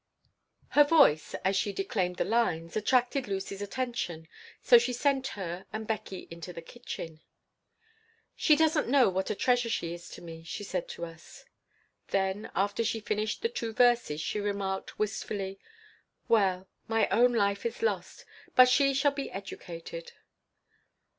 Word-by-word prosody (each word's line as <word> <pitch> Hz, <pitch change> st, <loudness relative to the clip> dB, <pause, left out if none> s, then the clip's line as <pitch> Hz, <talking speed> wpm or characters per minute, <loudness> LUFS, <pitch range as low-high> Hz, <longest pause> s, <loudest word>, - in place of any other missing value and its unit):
Her 295 Hz, -, +7 dB
voice, 285 Hz, -, +4 dB
as 190 Hz, +1 st, +2 dB
she 200 Hz, +1 st, +1 dB
declaimed 195 Hz, -, -1 dB
the -, -, 0 dB
lines, 175 Hz, -7 st, 0 dB
attracted 250 Hz, +4 st, +1 dB
Lucy's 195 Hz, 0 st, -4 dB
attention, 205 Hz, -7 st, -3 dB, 0.3 s
so 240 Hz, -2 st, +7 dB
she 245 Hz, +1 st, -1 dB
sent 270 Hz, +1 st, +1 dB
her 180 Hz, -1 st, -5 dB
and 215 Hz, +1 st, -4 dB
Beckie 200 Hz, -4 st, -4 dB
into 170 Hz, +2 st, -7 dB
the 170 Hz, -, -8 dB
kitchen 165 Hz, -7 st, -8 dB, 1.1 s
"She 305 Hz, -, +4 dB
doesn't 315 Hz, 0 st, +2 dB
know 260 Hz, -3 st, +5 dB
what 190 Hz, +1 st, -2 dB
a -, -, -1 dB
treasure 245 Hz, +1 st, +2 dB
she 170 Hz, -6 st, -2 dB
is 175 Hz, 0 st, -10 dB
to -, -, -11 dB
me," 165 Hz, -1 st, -9 dB
she 165 Hz, +5 st, -6 dB
said 185 Hz, -3 st, -3 dB
to 170 Hz, -, -6 dB
us. 165 Hz, -1 st, -13 dB, 0.6 s
Then, 195 Hz, +2 st, -1 dB
after 200 Hz, +4 st, +1 dB
she 225 Hz, 0 st, -1 dB
finished 215 Hz, -, -2 dB
the 460 Hz, -, +2 dB
two 230 Hz, -, -4 dB
verses, 240 Hz, -10 st, +3 dB
she 210 Hz, -, -2 dB
remarked, 200 Hz, -2 st, -3 dB
wistfully, 200 Hz, -2 st, -3 dB, 0.7 s
"Well, 190 Hz, -4 st, +2 dB, 0.2 s
my 225 Hz, -1 st, +2 dB
own 245 Hz, +2 st, +4 dB
life 200 Hz, -3 st, +1 dB
is 235 Hz, -, -4 dB
lost, 465 Hz, -, -2 dB, 0.3 s
but 255 Hz, 0 st, +9 dB
she 275 Hz, +2 st, +4 dB
shall 280 Hz, +1 st, +3 dB
be 280 Hz, -1 st, -4 dB
educated." 170 Hz, -3 st, -8 dB
205 Hz, 155 wpm, -29 LUFS, 185-245 Hz, 1.1 s, but